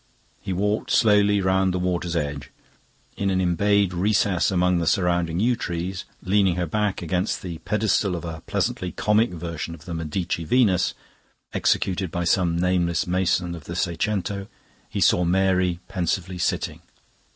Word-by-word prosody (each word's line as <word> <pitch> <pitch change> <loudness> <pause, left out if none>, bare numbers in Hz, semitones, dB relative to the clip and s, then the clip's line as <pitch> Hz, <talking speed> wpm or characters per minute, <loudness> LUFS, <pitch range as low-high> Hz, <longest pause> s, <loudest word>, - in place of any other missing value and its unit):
He - - -5
walked 105 +4 -1
slowly 105 -2 +4
round 95 0 +2
the 90 - -1
water's 90 -1 -1
edge. 70 -3 -3 0.7
In 100 - 0
an 95 -1 +1
embayed 95 +2 +2
recess 100 0 +2
among 90 -1 +2
the 85 - -1
surrounding 85 -2 +1
yew 120 +4 +3
trees, 90 -3 -4 0.2
leaning 95 -1 +2
her 90 -1 -1
back 105 +3 -1
against 90 +4 -1
the 85 -3 -6
pedestal 105 0 +1
of 85 - -5
a 80 -1 -6
pleasantly 90 -1 -1
comic 110 +2 +2
version 85 -1 -5
of 80 -1 -16
the 85 - -5
Medici 85 +1 -2
Venus, 100 -1 +2 0.6
executed 95 -1 +1
by 90 +2 -2
some 85 -1 +2
nameless 90 -1 +1
mason 90 -1 0
of 80 -4 -9
the 85 - -6
seicento, 100 +3 -2 0.4
he - - -3
saw 90 - +4
Mary 90 -1 +2
pensively 90 0 -2
sitting. - - -1
90 Hz, 150 wpm, -24 LUFS, 85-100 Hz, 0.7 s, slowly